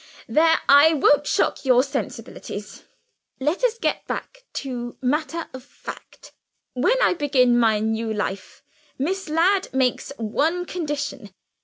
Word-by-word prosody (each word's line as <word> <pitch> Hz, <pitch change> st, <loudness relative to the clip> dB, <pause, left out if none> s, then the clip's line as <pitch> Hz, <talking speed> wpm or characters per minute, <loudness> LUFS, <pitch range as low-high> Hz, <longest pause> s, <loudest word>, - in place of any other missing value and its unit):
there! 325 Hz, +1 st, +4 dB
I 285 Hz, +3 st, +7 dB
won't 290 Hz, 0 st, +3 dB
shock -, -, 0 dB
your 255 Hz, -2 st, +4 dB
sensibilities. 275 Hz, -, -6 dB, 0.5 s
Let 300 Hz, -, -1 dB
us 470 Hz, -2 st, +2 dB
get -, -, -2 dB
back -, -, -6 dB
to 245 Hz, -3 st, -5 dB
matter 310 Hz, +5 st, -1 dB
of 260 Hz, -1 st, -9 dB
fact. -, -, -11 dB, 0.4 s
When 375 Hz, -, +2 dB
I -, -, +4 dB
begin 260 Hz, -7 st, +3 dB
my 220 Hz, -2 st, +3 dB
new 220 Hz, +1 st, -1 dB
life, 205 Hz, -2 st, -4 dB, 0.3 s
Miss 370 Hz, +6 st, -2 dB
Ladd 365 Hz, +5 st, +2 dB
makes 260 Hz, 0 st, 0 dB
one 310 Hz, +11 st, -1 dB
condition. 295 Hz, -, -4 dB
285 Hz, 130 wpm, -23 LUFS, 245-330 Hz, 0.5 s, I